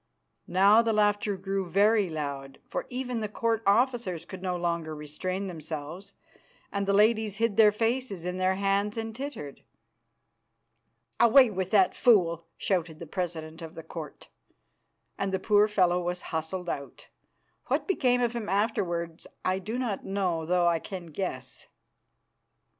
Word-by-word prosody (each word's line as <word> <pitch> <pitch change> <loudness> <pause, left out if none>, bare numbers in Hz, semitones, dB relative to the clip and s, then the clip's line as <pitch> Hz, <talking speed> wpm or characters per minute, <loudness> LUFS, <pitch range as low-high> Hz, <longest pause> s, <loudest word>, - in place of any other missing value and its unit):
Now 200 +5 +6
the 230 -1 0
laughter 205 -1 +2
grew 195 +1 -2
very 200 +2 +3
loud, 140 -3 -5
for - - -4
even 250 -1 -3
the 215 -1 -3
Court 225 +1 0
officers 215 -6 +2
could 185 0 -9
no 185 -1 -1
longer 170 -2 -2
restrain 185 +6 -4
themselves, 165 +2 -7 0.6
and 200 -1 -2
the - - +3
ladies 215 0 +3
hid 225 -1 0
their 215 -2 +7
faces 225 -4 -1
in 180 0 -3
their 185 0 +2
hands 200 +2 0
and 225 -1 -4
tittered. 260 - -7 1.6
"Away 235 +1 +7
with 190 -1 -2
that 195 -3 +4
fool!" 170 -8 +3
shouted 175 -5 -1
the 170 - -8
president 165 -1 -5
of 165 0 -9
the 165 - -8
Court, 155 -3 -9 0.9
and 195 -1 -1
the 190 - +1
poor 210 +2 +4
fellow 180 -4 +2
was 180 0 -3
hustled 165 +3 -3
out. 140 -4 -6 0.6
What - - 0
became 250 -10 +2
of 240 -1 +1
him 235 -3 -4
afterwards 175 -5 -1 0.2
I 185 +1 +1
do 215 +5 -4
not 235 -6 -2
know, 185 -5 -1
though 180 0 +2
I 170 -1 +2
can 175 -2 -8
guess. 130 -7 -5
190 Hz, 150 wpm, -28 LUFS, 170-215 Hz, 1.6 s, their